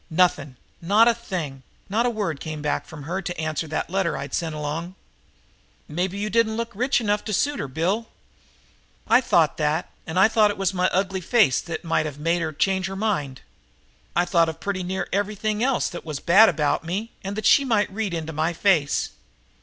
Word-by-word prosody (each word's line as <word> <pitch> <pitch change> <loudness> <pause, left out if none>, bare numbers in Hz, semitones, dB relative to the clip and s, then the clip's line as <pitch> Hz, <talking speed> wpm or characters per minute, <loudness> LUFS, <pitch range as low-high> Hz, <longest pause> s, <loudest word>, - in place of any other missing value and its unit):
"Nothing, 175 -5 +1 0.3
not 205 +7 +5
a 235 - +5
thing. 175 - -5 0.3
Not 225 +5 +1
a - - +3
word 205 -10 -2
came 155 -1 -6
back 150 - -1
from 155 -3 -10
her 180 +6 -3
to 175 -3 -5
answer 155 0 -2
that 155 +2 -3
letter 190 -3 0
I'd 140 +1 -6
sent 165 -3 -2
along." 155 +5 -4 0.9
"Maybe 180 +5 -2
you 205 +1 -2
didn't 220 0 +1
look 230 0 -3
rich 250 +7 +1
enough 210 -2 0
to 215 - -3
suit 285 +9 +1
her, - - -3
Bill." 180 - -1 1.0
"I 250 - +5
thought 165 - +2
that, 155 +2 -1 0.2
and 160 +2 -4
I 190 +3 +7
thought 220 -2 +4
it 205 - -3
was 195 -1 0
my 180 0 +2
ugly 190 0 -1
face 185 - +3
that 165 -2 -6
might 165 -2 0
of 145 -2 -7
made 165 +3 0
her 160 -1 -2
change 190 +4 0
her 195 - -6
mind. 190 -11 -2 0.7
I 175 - +3
thought 170 -3 +3
of 160 - -7
pretty 200 -2 -3
near 185 +1 -3
everything 210 +2 -1
else 265 -1 +1
that 175 - -8
was 155 -3 -5
bad 200 +8 +6
about 150 -1 0
me 195 +8 -3
and 195 +1 -4
that 215 -1 -4
she 280 - +6
might 225 -6 +1
of 195 - -14
read 205 -5 -2
in 160 -1 -4
my 160 +3 0
face. 165 -6 +1
185 Hz, 210 wpm, -24 LUFS, 160-210 Hz, 1.0 s, I